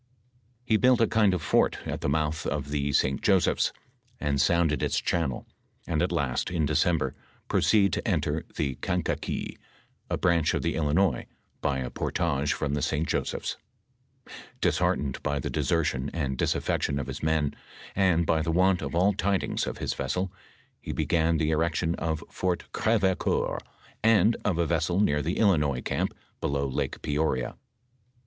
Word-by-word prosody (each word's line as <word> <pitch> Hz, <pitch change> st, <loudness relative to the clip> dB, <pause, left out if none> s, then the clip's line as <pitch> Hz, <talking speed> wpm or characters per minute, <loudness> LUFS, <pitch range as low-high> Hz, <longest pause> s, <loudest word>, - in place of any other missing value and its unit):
He 110 Hz, -3 st, +3 dB
built 125 Hz, +1 st, +4 dB
a 115 Hz, -, +5 dB
kind 110 Hz, -3 st, +3 dB
of 90 Hz, -4 st, -2 dB
fort -, -, +2 dB
at -, -, -4 dB
the -, -, 0 dB
mouth 80 Hz, +2 st, 0 dB
of 70 Hz, 0 st, -3 dB
the 70 Hz, -1 st, 0 dB
St. 65 Hz, 0 st, +1 dB
Joseph^s 95 Hz, -3 st, +3 dB, 0.5 s
and 70 Hz, -2 st, +1 dB
sounded 85 Hz, -3 st, +2 dB
its -, -, +1 dB
channel, 80 Hz, -7 st, -1 dB, 0.4 s
and, 80 Hz, -2 st, 0 dB
at 90 Hz, -, +1 dB
last, 70 Hz, -7 st, -1 dB
in 85 Hz, -3 st, 0 dB
December, 75 Hz, -2 st, +1 dB, 0.3 s
proceed 100 Hz, -4 st, +3 dB
to -, -, -2 dB
enter -, -, 0 dB
tlie 70 Hz, -3 st, -3 dB
Kankakee, -, -, -2 dB, 0.5 s
a -, -, 0 dB
branch 85 Hz, -3 st, +2 dB
of -, -, -1 dB
the -, -, 0 dB
Illinois, 80 Hz, +4 st, +1 dB, 0.3 s
by 70 Hz, -2 st, 0 dB
a 65 Hz, -2 st, -4 dB
portage 75 Hz, -3 st, -1 dB
from 75 Hz, -2 st, -1 dB
the 75 Hz, -, 0 dB
St. 75 Hz, +4 st, 0 dB
Josepli^s. -, -, -2 dB, 1.0 s
Disheart -, -, +2 dB
ened 70 Hz, -3 st, -4 dB
by 70 Hz, 0 st, -1 dB
the -, -, -4 dB
desertion 75 Hz, -5 st, 0 dB
and 70 Hz, -5 st, -1 dB
disaffection 70 Hz, +2 st, 0 dB
of 70 Hz, -, -2 dB
his 70 Hz, +1 st, -6 dB
men, 80 Hz, -2 st, +1 dB, 0.4 s
and 90 Hz, -4 st, +3 dB
by 80 Hz, 0 st, +2 dB
the 85 Hz, -, -2 dB
want 90 Hz, +2 st, +3 dB
of 70 Hz, +2 st, -4 dB
all 95 Hz, +4 st, +4 dB
tidings 100 Hz, 0 st, 0 dB
of -, -, -4 dB
his -, -, -2 dB
vessel, 90 Hz, +8 st, -2 dB, 0.5 s
he -, -, -5 dB
began 80 Hz, 0 st, +1 dB
the 80 Hz, 0 st, +1 dB
erection 80 Hz, +1 st, +1 dB
of 80 Hz, -2 st, -2 dB
Fort 90 Hz, -1 st, -1 dB
GrevecoBur, 100 Hz, -5 st, +1 dB, 0.4 s
and 115 Hz, 0 st, +5 dB
of 95 Hz, -5 st, 0 dB
a 85 Hz, -, +2 dB
vessel 85 Hz, +2 st, 0 dB
near 75 Hz, -8 st, +2 dB
the 85 Hz, +6 st, -2 dB
Illinois 75 Hz, -, +2 dB
camp -, -, -1 dB, 0.2 s
below 70 Hz, 0 st, -1 dB
Lake 65 Hz, -, -3 dB
Peoria. 75 Hz, -4 st, 0 dB
80 Hz, 165 wpm, -27 LUFS, 70-90 Hz, 1.0 s, a